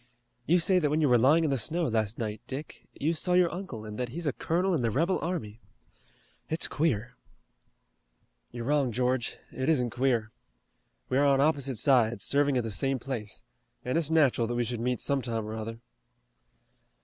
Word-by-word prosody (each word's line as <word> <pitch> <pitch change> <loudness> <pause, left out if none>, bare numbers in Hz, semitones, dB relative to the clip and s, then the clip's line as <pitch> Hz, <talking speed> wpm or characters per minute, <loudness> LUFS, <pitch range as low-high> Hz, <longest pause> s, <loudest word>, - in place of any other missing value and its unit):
You 175 - +5
say 180 +2 +3
that 150 -4 +1
when 150 +2 +1
you 155 - +3
were 125 -2 +4
lying 150 +7 +4
in 155 - +1
the 135 - +1
snow 165 +9 0
last 110 -6 0
night, 110 -2 -4
Dick, 140 +4 -8
you 160 +3 -1
saw 180 +2 0
your 180 -2 +3
uncle 170 - -6
and 105 +1 -7
that 125 -1 -2
he's 165 +7 -5
a 145 - 0
colonel 180 +3 0
in 155 - +1
the 115 - +1
rebel 165 - +1
army. 120 - -4 0.9
It's 160 - +2
queer." 125 -6 -1 1.4
"You're 120 -1 -6
wrong, 140 -2 +1
George, 125 +1 -1
it 130 +3 -2
isn't 125 -7 +2
queer. 120 -3 0 0.8
We're 135 +2 +2
on 140 -1 +4
opposite 140 -4 +1
sides, 120 -5 +3
serving 140 -1 +2
at 125 - 0
the 110 - -4
same 135 +8 0
place, 120 -5 -6 0.4
and 125 - -1
it's 165 -3 +1
natural 140 -7 +3
that 120 - -3
we 120 - +1
should 120 0 -4
meet 125 0 -1
some 140 -1 +1
time 115 -3 -3
or 110 - -6
other. 110 +1 -5
130 Hz, 190 wpm, -28 LUFS, 115-155 Hz, 1.4 s, You